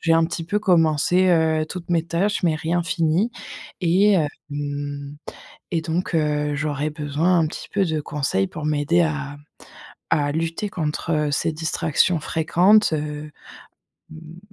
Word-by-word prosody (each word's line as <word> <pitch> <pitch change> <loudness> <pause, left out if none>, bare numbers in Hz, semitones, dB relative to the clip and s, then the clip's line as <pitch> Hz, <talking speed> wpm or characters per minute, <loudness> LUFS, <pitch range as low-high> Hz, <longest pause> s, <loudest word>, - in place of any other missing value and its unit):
j'ai 165 - +2
un 165 0 +4
petit 165 -1 -5
peu 205 +5 0
commencé, 180 -1 +3
heu, 160 -2 +2
toutes 170 +1 -8
mes 170 -2 +2
tâches, 185 +5 -1
mais 165 -3 +2
rien 165 +2 -1
fini 165 +6 +1 0.5
et 190 +4 +4
hem 160 -6 +2 1.4
et 165 - +1
donc, 170 +3 -2
heu, 150 -2 0
j'aurais 150 0 -2
besoin 150 +4 +1
un 160 - +2
petit - - -8
peu 200 -1 +2
de 160 -2 -1
conseils 135 -10 -1
pour 160 -3 -7
m'aider 155 +3 +2
à 150 -3 -3 0.8
à 145 -2 +2
lutter 165 +6 -2
contre 155 -2 -1
ces 160 +3 0
distractions 160 +1 +1
fréquentes, 175 +6 +3
heu, 150 0 -4 0.8
mmh, 160 +1 -12
160 Hz, 145 wpm, -22 LUFS, 150-175 Hz, 1.4 s, un